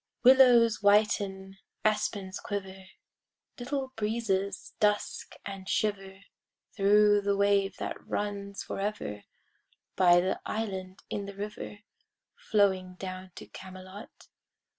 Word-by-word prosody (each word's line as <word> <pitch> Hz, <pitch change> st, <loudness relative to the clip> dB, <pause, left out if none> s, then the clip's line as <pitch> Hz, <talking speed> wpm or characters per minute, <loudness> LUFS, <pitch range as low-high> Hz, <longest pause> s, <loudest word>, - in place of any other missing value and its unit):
Willows 245 Hz, -4 st, +6 dB
whiten, 200 Hz, -2 st, +2 dB, 0.3 s
aspens 205 Hz, -3 st, 0 dB
quiver, 190 Hz, -2 st, -6 dB, 0.7 s
Little 265 Hz, +1 st, -3 dB
breezes 210 Hz, -3 st, -2 dB
dusk 210 Hz, -1 st, 0 dB
and 195 Hz, -2 st, -7 dB
shiver 195 Hz, -3 st, -1 dB, 0.5 s
Thro' 205 Hz, 0 st, +5 dB
the 200 Hz, 0 st, 0 dB
wave 200 Hz, -1 st, +2 dB
that -, -, -5 dB
runs 200 Hz, -1 st, -3 dB
forever 195 Hz, -, -4 dB, 0.7 s
By 175 Hz, -2 st, +6 dB
the 185 Hz, +2 st, -1 dB
island 190 Hz, -4 st, -4 dB
in 200 Hz, -1 st, -3 dB
the 200 Hz, -, -8 dB
river 205 Hz, 0 st, -7 dB, 0.5 s
Flowing 195 Hz, -, +1 dB
down 185 Hz, -1 st, -7 dB
to -, -, -9 dB
Camelot. 185 Hz, +2 st, -11 dB
200 Hz, 100 wpm, -29 LUFS, 190-210 Hz, 0.7 s, Willows